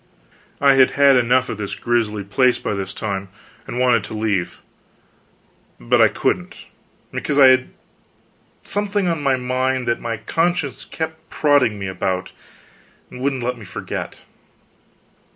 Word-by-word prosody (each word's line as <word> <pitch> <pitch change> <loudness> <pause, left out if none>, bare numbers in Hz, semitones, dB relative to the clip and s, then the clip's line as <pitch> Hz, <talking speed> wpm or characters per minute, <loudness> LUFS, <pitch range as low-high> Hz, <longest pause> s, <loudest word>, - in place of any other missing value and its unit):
I 140 -1 +5
had 130 -1 +4
had 140 -1 +6
enough 125 +1 +3
of 105 - -5
this 100 -2 -4
grisly 110 -3 -1
place 125 +5 +2
by - - -3
this 95 -1 -4
time, 100 -2 -4 0.4
and 120 - -5
wanted 125 -4 +3
to - - -7
leave, 105 -5 -1 1.2
but - - +2
I - - +8
couldn't, - - -2 0.5
because 145 - -2
I 135 -2 +8
had 130 0 +3 0.9
something 205 -1 -1
on 165 -3 -1
my 135 -2 +2
mind 130 0 -1
that 120 - 0
my 115 -1 -3
conscience 165 +5 -1
kept 160 0 -6
prodding 140 -8 +2
me 100 - -5
about, 95 0 -3 0.8
and 125 - -9
wouldn't 135 -2 -1
let 125 0 -2
me - - -10
forget. 85 - -6
125 Hz, 145 wpm, -20 LUFS, 105-140 Hz, 1.2 s, I